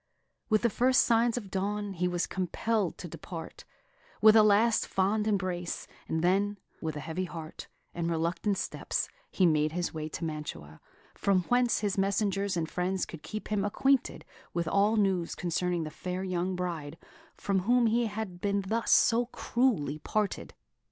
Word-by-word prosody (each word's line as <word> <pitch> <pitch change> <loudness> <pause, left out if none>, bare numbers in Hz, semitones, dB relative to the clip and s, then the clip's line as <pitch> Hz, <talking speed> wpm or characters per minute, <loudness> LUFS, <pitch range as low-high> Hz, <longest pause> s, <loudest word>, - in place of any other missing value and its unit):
With 215 0 +3
the 235 - +4
first 255 +3 +4
signs 235 0 +3
of 205 -6 -6
dawn, 205 +1 -2
he 180 0 0
was 175 -1 0
compelled 190 +2 -1
to 175 - -7
depart, 165 +1 -8 0.5
with 215 0 +7
a 220 - +9
last 215 +2 +4
fond 210 +3 +1
embrace, 185 -4 -1 0.2
and 160 0 -1
then, 200 +3 +2 0.2
with 160 -2 -3
a - - -4
heavy 170 +4 -3
heart, 165 -3 -8 0.3
and 170 -1 -2
reluctant 170 +5 0
steps, - - -2 0.2
he 185 - +2
made 155 -2 +2
his 175 0 -2
way 155 -1 -4
to 165 - -4
Mantua, 150 - -6 0.3
from 190 -2 +1
whence 245 -2 +3
his 205 -1 0
messengers 200 -1 0
and 160 -1 -1
friends 180 +2 -1
could 165 - -10
keep 215 - -6
him 210 -2 0
acquainted 265 +6 +1 0.3
with 170 -1 0
all 200 +5 +3
news 190 -5 +1
concerning 175 0 -1
the 155 - -6
fair 180 +3 -4
young 185 0 -1
bride 165 -4 -4 0.4
from 195 -1 0
whom 240 +5 +3
he 230 +1 +2
had 205 -4 -5
been 200 0 +1
thus 225 +4 -1
so 235 0 +5
cruelly 225 - 0
parted. 210 +5 -2
190 Hz, 165 wpm, -29 LUFS, 170-215 Hz, 0.5 s, a